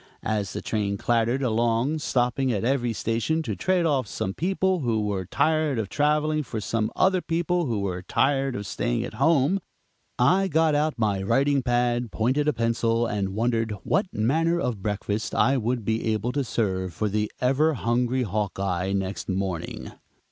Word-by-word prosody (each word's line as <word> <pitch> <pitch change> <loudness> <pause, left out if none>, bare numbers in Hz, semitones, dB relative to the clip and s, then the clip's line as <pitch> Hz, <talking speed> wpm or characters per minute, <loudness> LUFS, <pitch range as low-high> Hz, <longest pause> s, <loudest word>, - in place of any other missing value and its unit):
As 105 -3 -1
the - - -5
train 100 -2 -1
clattered 120 +4 +1
along, 120 +5 +1
stopping 125 -1 0
at 105 -3 -1
every 120 -1 +1
station 115 +8 -1
to 110 -8 -3
trade 185 - +1
off 140 -7 +1
some 95 -1 -3
people 190 - 0
who 115 -6 0
were 95 -3 -2
tired 155 +2 +1
of 110 -3 -2
traveling 150 +1 +1
for 115 -5 -5
some 110 +1 -1
other 185 -1 +3
people 175 0 0
who 110 -4 -1
were 90 -2 -3
tired 135 +6 +1
of 100 - -4
staying - - -1
at - - -6
home, 165 +3 +3 0.6
I 185 +10 +3
got 160 -2 +2
out 150 0 +1
my 105 -4 0
writing 135 +7 +2
pad, 120 -2 0
pointed 130 +7 +1
a 150 - +3
pencil, 115 0 +1
and 100 -3 -2
wondered 115 -1 0
what 200 - +1
manner 165 +10 +1
of 120 - -2
breakfast 105 +1 -2
I 135 +1 +3
would 120 -1 -1
be 110 +1 0
able 110 +3 -1
to 140 +1 -1
serve 95 -7 -2
for 110 - 0
the 105 +1 -1
ever 145 +5 +2
hungry 125 +2 0
"Hawkeye" 95 -3 -2
next 95 0 -3
morning. 95 -3 -3
120 Hz, 170 wpm, -25 LUFS, 105-145 Hz, 0.6 s, other